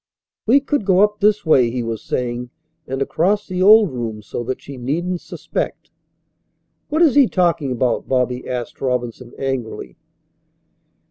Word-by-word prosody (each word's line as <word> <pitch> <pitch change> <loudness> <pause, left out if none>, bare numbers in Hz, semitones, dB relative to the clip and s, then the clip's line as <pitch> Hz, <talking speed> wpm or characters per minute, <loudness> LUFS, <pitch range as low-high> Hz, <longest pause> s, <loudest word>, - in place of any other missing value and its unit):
"We 270 +5 +5
could 285 -3 -1
go 190 -1 +3
up 210 0 +2
this 210 0 +2
way," 130 -7 +4
he 120 +1 -3
was 115 -2 -4
saying, 125 0 -3 0.4
"and 135 +1 -1
across 195 +9 0
the 185 -1 -3
old 210 -2 +7
room 115 -4 -5
so 120 - -5
that 130 +2 -3
she 140 - -10
needn't 170 +8 -2
suspect." - - -5 1.0
"What 315 +3 +3
is 305 -6 +5
he 280 -3 +6
talking 170 -8 +1
about?" 125 -1 0
Bobby 125 -1 0
asked 125 -2 -5
Robinson 125 -2 -3
angrily. 125 - -4
135 Hz, 150 wpm, -20 LUFS, 125-195 Hz, 1.0 s, old